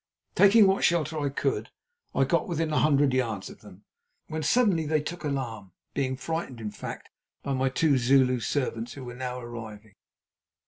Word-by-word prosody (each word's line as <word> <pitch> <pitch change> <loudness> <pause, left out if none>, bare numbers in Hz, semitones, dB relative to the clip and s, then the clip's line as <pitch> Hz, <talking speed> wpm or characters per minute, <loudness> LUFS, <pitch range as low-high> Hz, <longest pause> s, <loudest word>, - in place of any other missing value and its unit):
Taking 205 +2 +6
what 195 0 +2
shelter 160 -2 +1
I 145 -1 0
could, 135 - -2 0.5
I - - +4
got - - +1
within 165 -3 -1
a - - +3
hundred 145 -3 +3
yards 115 -6 -1
of - - -15
them, - - -15 0.5
when 155 0 -3
suddenly 175 -2 +2
they 155 0 +2
took 165 +4 -6
alarm, 115 - -4 0.2
being 130 -2 -1
frightened, 145 -3 -4
in 105 -2 -5
fact, - - -8 0.3
by 140 - -2
my 130 0 +1
two 140 0 +2
Zulu 130 0 +4
servants, 115 -1 -2
who 135 - -9
were 120 - -7
now 125 0 -4
arriving. 110 -3 -9
135 Hz, 175 wpm, -27 LUFS, 120-155 Hz, 0.5 s, Taking